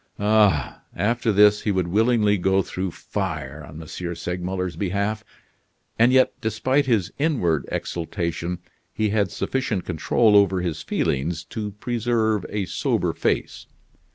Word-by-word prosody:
Ah! 105 -8 +2
after 115 +2 +1
this 105 +1 +5
he - - -2
would 95 -3 0
willingly 105 +2 +3
go 95 +1 +2
through 95 +1 -3
fire 70 -2 -5
on 75 +1 -10
M. 80 - -8 0.3
Segmuller's 90 +1 -3
behalf. 100 +4 -1 0.8
And 115 +2 +6
yet, 130 0 +4
despite 130 +6 +1
his 110 -8 +1
inward 115 - +1
exultation, 85 0 -3 0.3
he 110 -1 0
had 100 -2 +1
sufficient 115 -3 -2
control 105 +6 +2
over 95 -2 +4
his 85 -4 -3
feelings 80 +5 -1
to 105 -2 -4
preserve 110 -2 0
a 105 -2 -2
sober - - 0
face. - - -2
100 Hz, 130 wpm, -23 LUFS, 90-110 Hz, 0.8 s, And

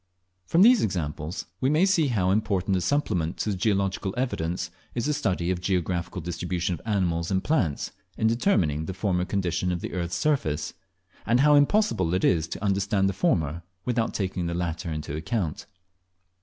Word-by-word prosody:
From 170 +3 +5
these 240 0 +7
examples 80 -2 -3
we 130 - +2
may 155 +5 +4
see 180 -6 +3
how 95 -7 +1
important 95 -2 +1
a 90 - 0
supplement 90 - 0
to 105 -2 -1
geological 95 -1 0
evidence 90 -8 -2 0.2
is 120 - -1
the 150 - +1
study 90 -11 0
of 90 - -1
the - - -17
geographical 90 -1 -1
distribution 90 +1 -2
of 85 - -6
animals 85 -5 0
and 95 -1 0
plants, 90 - 0 0.3
in - - 0
determining 95 - +2
the 95 - -4
former 90 -2 0
condition 90 -2 -1
of 85 -1 -2
the - - -5
earth's 85 -1 -2
surface; 90 - 0 0.5
and 120 +3 +3
how 150 +1 +6
impossible 145 - +3
it 95 - -1
is 80 -2 +3
to 90 - -6
understand 100 0 +1
the - - -2
former 85 - 0 0.2
without 120 -2 0
taking 95 -3 -2
the 85 - -2
latter 85 -1 -3
into 75 -2 -4
account. 80 +1 -3
95 Hz, 175 wpm, -26 LUFS, 85-115 Hz, 0.5 s, these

